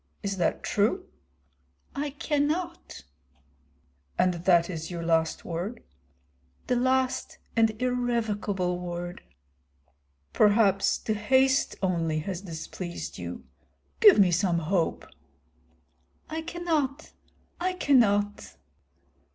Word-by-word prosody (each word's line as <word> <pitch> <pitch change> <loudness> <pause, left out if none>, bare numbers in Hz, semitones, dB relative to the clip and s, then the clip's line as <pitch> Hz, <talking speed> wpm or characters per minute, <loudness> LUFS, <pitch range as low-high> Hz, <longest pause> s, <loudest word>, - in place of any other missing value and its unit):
Is 195 -1 -2
that 175 - 0
true?" 235 - +1 0.9
"I 290 +1 -2
cannot." 300 - -2 1.1
"And 180 0 +3
that 170 0 +3
is 165 -3 -5
your 170 -2 -5
last 160 -1 +1
word?" 180 +8 -4 0.8
"The 250 - +1
last 260 +1 0 0.2
and 225 -2 +2
irrevocable 220 -7 -1
word." 175 0 -5 1.1
"Perhaps 205 -2 +4
the 220 - -2
haste 260 +6 +2
only 165 -4 0
has 185 +1 -4
displeased 170 0 -7
you. - - -7 0.5
Give 420 -4 +8
me 190 -3 +5
some 175 0 +2
hope." 165 +1 -1 1.3
"I 320 +1 -2
cannot, 320 -4 -2 0.5
I 365 +1 0
cannot." 205 - +2
205 Hz, 95 wpm, -27 LUFS, 175-265 Hz, 1.3 s, Give